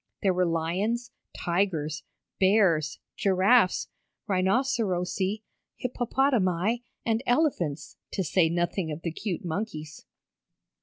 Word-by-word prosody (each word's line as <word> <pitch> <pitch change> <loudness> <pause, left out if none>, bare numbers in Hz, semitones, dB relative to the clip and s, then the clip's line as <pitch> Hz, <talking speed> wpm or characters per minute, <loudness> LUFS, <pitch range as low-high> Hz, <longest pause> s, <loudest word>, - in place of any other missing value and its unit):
There 190 -2 +4
were 180 0 +2
lions, 185 +9 -1 0.3
tigers, 170 -4 0 0.4
bears, 185 -6 +3 0.2
giraffes, 195 +2 +3 0.4
rhinocerosi, 195 -1 0 0.3
hippopotami, 240 -4 +1 0.2
and 225 0 +1
elephants, 245 - 0 0.2
to 190 - 0
say 165 0 +3
nothing 175 0 -1
of 150 +2 -6
the 170 - -1
cute 180 +1 -4
monkeys. 160 -4 -4
185 Hz, 95 wpm, -27 LUFS, 170-220 Hz, 0.4 s, There